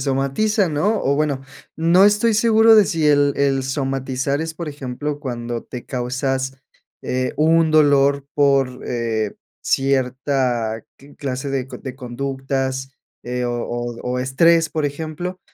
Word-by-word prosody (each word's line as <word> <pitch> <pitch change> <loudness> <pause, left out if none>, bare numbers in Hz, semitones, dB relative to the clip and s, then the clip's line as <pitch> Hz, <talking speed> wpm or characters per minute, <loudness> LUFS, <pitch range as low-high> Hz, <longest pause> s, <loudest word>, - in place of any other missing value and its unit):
somatiza, 140 - +1
¿no?, 190 +9 0
o 140 +1 +1
bueno, 145 -3 0 0.3
no 170 +4 +4
estoy 210 +2 +4
seguro 220 0 +5
de 210 - +7
si 160 -4 0
el 145 -1 +4
el 135 -2 +1
somatizar 135 +1 -2
es, 160 0 -4
por 165 -1 -5
ejemplo, 145 +1 -5
cuando 120 -4 -5
te 125 -2 -8
causas, 130 +1 -2 0.4
eh, 130 0 -1
un 160 +1 +3
dolor 140 -2 +4
por, 135 -3 +2
eh, 110 -3 -2 0.3
cierta 130 -3 0 0.2
cl 140 +1 -17
clase 135 0 -4
de 135 -2 -2
c - - -8
de 130 -2 -8
conductas, 135 +1 -3 0.3
eh, 125 +1 -3
o 120 - -1
o 120 0 -4 0.2
o 125 - -1
estrés, 160 +5 +3
por 155 -2 -2
ejemplo, 160 +5 -4
140 Hz, 145 wpm, -20 LUFS, 130-155 Hz, 0.4 s, de